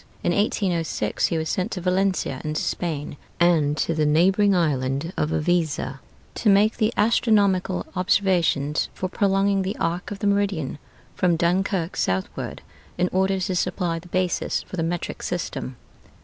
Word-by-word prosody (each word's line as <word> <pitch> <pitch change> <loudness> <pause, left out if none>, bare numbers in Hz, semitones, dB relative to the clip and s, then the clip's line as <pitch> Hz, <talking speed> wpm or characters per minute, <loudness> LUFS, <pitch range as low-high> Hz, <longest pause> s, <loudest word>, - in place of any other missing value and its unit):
In - - +2
1806 175 - 0
he 165 - -1
was 160 0 -2
sent 185 +5 -1
to 185 - -3
Valencia 185 -6 0
in 155 0 -3
Spain, 150 -3 -3 0.2
and 160 -4 +3
to 165 - 0
the 155 -1 0
neighboring 190 +7 +4
island 145 -1 0
of 150 - 0
Iviza, 155 -4 0 0.3
to 220 - +1
make 205 +2 +4
the 220 -1 +2
astronomical 205 -4 +2
observations 175 -6 +1
for 185 - -2
prolonging 195 +1 +1
the 190 +3 -3
arc 170 +3 -2
of 205 - -5
the 200 - -4
meridian 200 -8 0 0.3
from 180 -2 +2
Dunkirk 180 +1 0
southward, 95 0 -2 0.3
in 180 0 +1
order 190 +1 +1
to 185 0 -1
supply 175 -1 -1
the 180 - -14
basis 185 0 -1
for - - -9
the 170 - -1
metric 170 +1 -3
system. 135 -7 -4
180 Hz, 150 wpm, -24 LUFS, 160-195 Hz, 0.3 s, neighboring